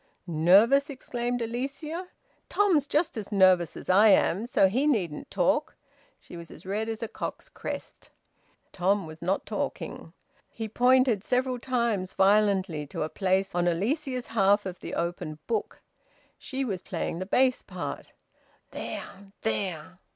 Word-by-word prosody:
"Nervous!" 195 Hz, -, +4 dB
exclaimed 245 Hz, -3 st, -3 dB
Alicia. 280 Hz, +9 st, -4 dB, 0.4 s
"Tom's 355 Hz, -9 st, +3 dB
just 305 Hz, -3 st, 0 dB
as 215 Hz, -1 st, -6 dB
nervous 185 Hz, -4 st, +4 dB
as -, -, -10 dB
I 200 Hz, +4 st, +6 dB
am! 205 Hz, +1 st, +3 dB
So 195 Hz, -5 st, +4 dB
he 255 Hz, +10 st, +1 dB
needn't 180 Hz, -, -1 dB
talk." -, -, +1 dB, 0.4 s
She -, -, -13 dB
was 170 Hz, -1 st, -9 dB
as -, -, -13 dB
red 210 Hz, +4 st, -2 dB
as 225 Hz, +1 st, -4 dB
a -, -, -2 dB
cock's -, -, -6 dB
crest. -, -, -7 dB, 0.6 s
Tom 195 Hz, +1 st, +1 dB
was 155 Hz, 0 st, -11 dB
not 185 Hz, +3 st, -1 dB
talking. -, -, -4 dB, 0.4 s
He 225 Hz, -, -5 dB
pointed 245 Hz, -2 st, +3 dB
several 255 Hz, +1 st, 0 dB
times 235 Hz, -7 st, -1 dB
violently 195 Hz, -6 st, +2 dB
to 145 Hz, -, -3 dB
a 155 Hz, -, -3 dB
place 190 Hz, +1 st, 0 dB
on 175 Hz, 0 st, +1 dB
Alicia's 250 Hz, -, -1 dB
half 205 Hz, -1 st, +3 dB
of 185 Hz, -1 st, -6 dB
the -, -, -6 dB
open 170 Hz, -3 st, -3 dB
book 445 Hz, -, -2 dB, 0.6 s
she 270 Hz, 0 st, -3 dB
was 195 Hz, -6 st, -3 dB
playing 170 Hz, -2 st, -4 dB
the 185 Hz, -, -4 dB
bass 255 Hz, +4 st, +3 dB
part. -, -, -6 dB, 0.6 s
"There! 195 Hz, 0 st, -7 dB
There!" 185 Hz, -4 st, -2 dB
205 Hz, 145 wpm, -27 LUFS, 185-250 Hz, 0.6 s, I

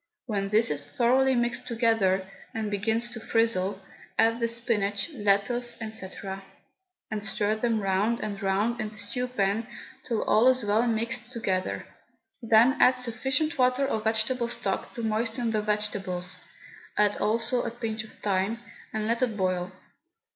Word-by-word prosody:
When 200 Hz, -5 st, -2 dB
this 215 Hz, -3 st, +3 dB
is 145 Hz, -1 st, 0 dB
thoroughly 260 Hz, +2 st, +3 dB
mixed 240 Hz, +1 st, -1 dB
together, 225 Hz, -5 st, +2 dB, 0.3 s
and 215 Hz, -2 st, -2 dB
begins 220 Hz, +3 st, 0 dB
to 235 Hz, -, -7 dB
frizzle, 210 Hz, -4 st, +1 dB, 0.4 s
add 230 Hz, +1 st, +3 dB
the 235 Hz, -, +1 dB
spinach, 230 Hz, 0 st, 0 dB
lettuce, 235 Hz, +2 st, +1 dB
&c., 220 Hz, -4 st, -4 dB, 1.0 s
and 210 Hz, -1 st, -2 dB
stir 210 Hz, +1 st, 0 dB
them 225 Hz, 0 st, 0 dB
round 200 Hz, +4 st, +1 dB
and 205 Hz, -2 st, -4 dB
round 205 Hz, +5 st, 0 dB
in 215 Hz, -, -3 dB
the 215 Hz, -, -15 dB
stew 250 Hz, +5 st, -3 dB
pan 220 Hz, -1 st, 0 dB, 0.4 s
till 230 Hz, -3 st, -1 dB
all 220 Hz, +4 st, +4 dB
is 255 Hz, -3 st, +4 dB
well 215 Hz, +4 st, +2 dB
mixed 235 Hz, +1 st, -1 dB
together. 190 Hz, -6 st, -2 dB, 0.6 s
Then 230 Hz, +3 st, +5 dB
add 255 Hz, 0 st, +6 dB
sufficient 265 Hz, +5 st, 0 dB
water 255 Hz, +2 st, +3 dB
or 270 Hz, -, 0 dB
vegetable 225 Hz, +3 st, +1 dB
stock 195 Hz, -4 st, -2 dB
to 235 Hz, -, -4 dB
moisten 225 Hz, +2 st, 0 dB
the 215 Hz, -1 st, +1 dB
vegetables 205 Hz, -4 st, -2 dB, 0.6 s
(add 210 Hz, -1 st, +3 dB
also 230 Hz, +3 st, +1 dB
a -, -, -2 dB
pinch 225 Hz, -2 st, -4 dB
of 220 Hz, -, -13 dB
thyme), 200 Hz, +2 st, -1 dB, 0.3 s
and 215 Hz, -1 st, -2 dB
let 230 Hz, +2 st, 0 dB
it 230 Hz, -4 st, 0 dB
boil. 185 Hz, -1 st, 0 dB
220 Hz, 155 wpm, -27 LUFS, 205-240 Hz, 1.0 s, add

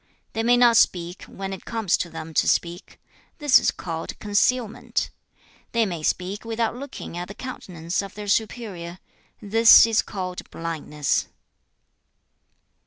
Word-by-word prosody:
They 225 Hz, -, -1 dB
may 240 Hz, +2 st, +4 dB
not 240 Hz, -2 st, +6 dB
speak 175 Hz, -4 st, +1 dB
when 195 Hz, 0 st, -6 dB
it 190 Hz, -, -8 dB
comes 225 Hz, -6 st, 0 dB
to 175 Hz, -, -3 dB
them 165 Hz, 0 st, -8 dB
to -, -, +2 dB
speak; 175 Hz, +2 st, -1 dB, 0.4 s
this 295 Hz, -4 st, +6 dB
is -, -, +1 dB
called 165 Hz, -2 st, -5 dB
concealment. 215 Hz, +2 st, 0 dB, 0.6 s
They 230 Hz, -1 st, +3 dB
may 175 Hz, -5 st, -4 dB
speak 185 Hz, +6 st, -2 dB
without 230 Hz, 0 st, -1 dB
looking 265 Hz, -8 st, -8 dB
at 175 Hz, 0 st, -4 dB
the 200 Hz, -, -9 dB
countenance 180 Hz, -10 st, -4 dB
of 195 Hz, -1 st, -9 dB
their 210 Hz, 0 st, -7 dB
superior; 200 Hz, -5 st, -2 dB, 0.5 s
this 225 Hz, +3 st, +8 dB
is 225 Hz, -1 st, +2 dB
called 185 Hz, -2 st, -6 dB
blindness.' 155 Hz, -3 st, -2 dB
200 Hz, 140 wpm, -24 LUFS, 170-230 Hz, 0.6 s, this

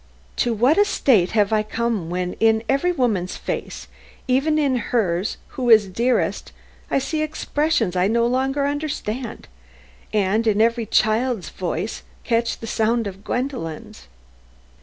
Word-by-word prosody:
"To 240 Hz, -, +1 dB
what 245 Hz, -, +3 dB
a -, -, +7 dB
state 220 Hz, -, +2 dB
have 210 Hz, -1 st, +2 dB
I 215 Hz, -, +3 dB
come 215 Hz, -5 st, -2 dB
when 180 Hz, 0 st, -2 dB
in 220 Hz, 0 st, +3 dB
every 275 Hz, +7 st, +2 dB
woman's 220 Hz, -, 0 dB
face, -, -, -5 dB, 0.4 s
even 275 Hz, +5 st, +2 dB
in 280 Hz, -4 st, +2 dB
hers 195 Hz, -4 st, 0 dB
who 250 Hz, -2 st, -3 dB
is 215 Hz, -3 st, +7 dB
dearest, 235 Hz, +7 st, 0 dB, 0.4 s
I -, -, +1 dB
see 305 Hz, +3 st, -1 dB
expressions 300 Hz, -, 0 dB
I 180 Hz, +1 st, +2 dB
no 235 Hz, +2 st, +2 dB
longer 265 Hz, +3 st, 0 dB
understand, 280 Hz, -5 st, -4 dB, 0.6 s
and 210 Hz, +2 st, +1 dB
in 210 Hz, -1 st, +2 dB
every 230 Hz, 0 st, +2 dB
child's 220 Hz, -1 st, +1 dB
voice 180 Hz, +3 st, -4 dB, 0.2 s
catch 230 Hz, -1 st, 0 dB
the -, -, -5 dB
sound 225 Hz, +1 st, 0 dB
of 195 Hz, 0 st, -7 dB
Gwendolen's?" 245 Hz, -, -4 dB
230 Hz, 140 wpm, -22 LUFS, 205-260 Hz, 0.6 s, a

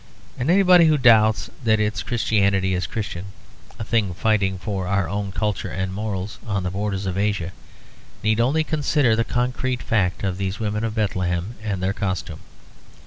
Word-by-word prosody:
And 125 Hz, +5 st, -2 dB
anybody 180 Hz, -2 st, +6 dB
who 155 Hz, -1 st, +4 dB
doubts 110 Hz, -4 st, +4 dB
that 110 Hz, -2 st, +3 dB
its 105 Hz, 0 st, 0 dB
Christianity 100 Hz, -5 st, +1 dB
is 90 Hz, -1 st, -1 dB
Christian, 95 Hz, -3 st, -4 dB, 0.5 s
a -, -, -4 dB
thing 105 Hz, -5 st, 0 dB
fighting 100 Hz, -2 st, +1 dB
for 95 Hz, -1 st, -4 dB
our 100 Hz, -2 st, +1 dB
own 100 Hz, +3 st, -3 dB
culture 105 Hz, 0 st, -2 dB
and 95 Hz, -1 st, -3 dB
morals 100 Hz, -1 st, -4 dB
on 100 Hz, -3 st, -1 dB
the 90 Hz, -, -2 dB
borders 100 Hz, 0 st, -2 dB
of 95 Hz, 0 st, -2 dB
Asia, 100 Hz, -4 st, -1 dB, 0.7 s
need 110 Hz, +1 st, +2 dB
only 140 Hz, +7 st, +2 dB
consider 145 Hz, -6 st, +2 dB
the 115 Hz, -, +1 dB
concrete 125 Hz, +1 st, -1 dB
fact 95 Hz, -5 st, 0 dB
of 95 Hz, -1 st, -2 dB
these 95 Hz, 0 st, -3 dB
women 105 Hz, 0 st, -2 dB
of 110 Hz, -1 st, -2 dB
Bethlehem 95 Hz, -2 st, -1 dB
and 100 Hz, -4 st, -3 dB
their 95 Hz, +1 st, +1 dB
costume. 95 Hz, -4 st, -3 dB
105 Hz, 170 wpm, -22 LUFS, 95-115 Hz, 0.7 s, anybody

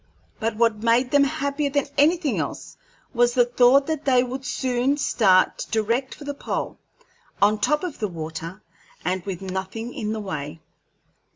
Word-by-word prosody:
But 225 Hz, -1 st, -1 dB
what 225 Hz, -1 st, +1 dB
made 235 Hz, +2 st, +2 dB
them 285 Hz, -1 st, +5 dB
happier 280 Hz, +1 st, -1 dB
than 285 Hz, -1 st, 0 dB
anything 310 Hz, +1 st, +2 dB
else -, -, -5 dB, 0.4 s
was 240 Hz, -1 st, +2 dB
the 245 Hz, -1 st, +5 dB
thought 245 Hz, +3 st, +4 dB
that 315 Hz, -1 st, -3 dB
they 255 Hz, -2 st, +4 dB
would 260 Hz, +2 st, -5 dB
soon 260 Hz, +1 st, 0 dB
start 195 Hz, -9 st, +2 dB
direct 230 Hz, +4 st, -1 dB
for -, -, -12 dB
the 285 Hz, 0 st, -4 dB
pole, 285 Hz, -, -4 dB, 0.6 s
on 210 Hz, +1 st, +3 dB
top 300 Hz, +6 st, +1 dB
of 355 Hz, -5 st, -5 dB
the 210 Hz, -, -1 dB
water, 165 Hz, +2 st, -7 dB, 0.4 s
and 185 Hz, -1 st, -1 dB
with 195 Hz, -1 st, -5 dB
nothing 190 Hz, +5 st, -5 dB
in 215 Hz, 0 st, -3 dB
the 220 Hz, -, -3 dB
way. 160 Hz, -7 st, -5 dB
240 Hz, 165 wpm, -23 LUFS, 205-275 Hz, 0.6 s, them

